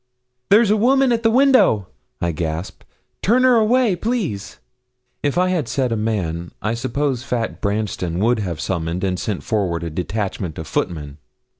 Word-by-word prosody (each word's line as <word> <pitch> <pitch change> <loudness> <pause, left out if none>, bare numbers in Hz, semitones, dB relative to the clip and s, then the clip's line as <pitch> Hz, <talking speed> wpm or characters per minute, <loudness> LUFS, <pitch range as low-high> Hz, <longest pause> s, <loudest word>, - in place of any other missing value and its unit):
'There's 210 +1 +5
a - - +5
woman 260 +4 +3
at 230 -1 +1
the 225 - +3
window!' 255 - +4 0.3
I 85 - 0
gasped; 80 +2 -4 0.4
'turn 245 +5 +3
her 255 -1 +6
away, 225 -1 +3
please.' 175 - -3 0.6
If 145 +2 -1
I 185 +1 +3
had 170 -8 0
said 125 +1 -1
a - - +1
man, 90 -6 -2
I 110 - -1
suppose 130 +2 -1
fat 120 -3 -3
Branston 100 -5 -2
would 115 +4 +2
have 90 -6 -3
summoned 85 0 -2
and 95 -1 0
sent 105 -4 -3
forward 95 -8 -1
a 85 - -4
detachment 95 -1 -3
of 80 - -5
footmen. 75 -4 -3
110 Hz, 165 wpm, -20 LUFS, -, 0.6 s, her